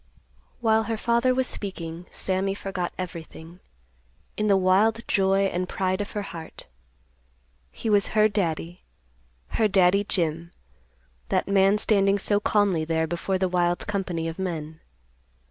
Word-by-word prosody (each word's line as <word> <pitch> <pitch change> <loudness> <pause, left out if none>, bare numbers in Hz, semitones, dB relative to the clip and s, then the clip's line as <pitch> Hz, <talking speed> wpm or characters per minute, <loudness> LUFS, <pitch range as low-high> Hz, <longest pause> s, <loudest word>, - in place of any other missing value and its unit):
While 220 -1 +3
her 225 -1 -2
father 235 +3 +2
was 260 0 +1
speaking, 175 -6 -6
Sammy 195 +1 -1
forgot 185 -3 -4
everything, 170 -1 -8 0.8
in 215 - -1
the 200 -2 +4
wild 205 +5 +2
joy 195 0 +2
and 180 -1 -2
pride 185 +1 -1
of 205 - -6
her 205 - -3
heart. 165 -4 -9 1.1
He - - -6
was 205 -2 +3
her 215 0 +6
Daddy, 175 -4 -3 0.7
her 220 - +2
Daddy 195 0 +3
Jim; 170 -3 -1 0.8
that - - 0
man 195 +1 +4
standing 200 -2 +3
so 205 +1 +1
calmly 205 -6 +1
there 160 0 0
before 175 +4 -2
the 185 0 +1
wild 175 -1 0
company 185 -5 -2
of 165 +2 -6
men. 160 -4 -4
190 Hz, 140 wpm, -25 LUFS, 175-205 Hz, 1.1 s, her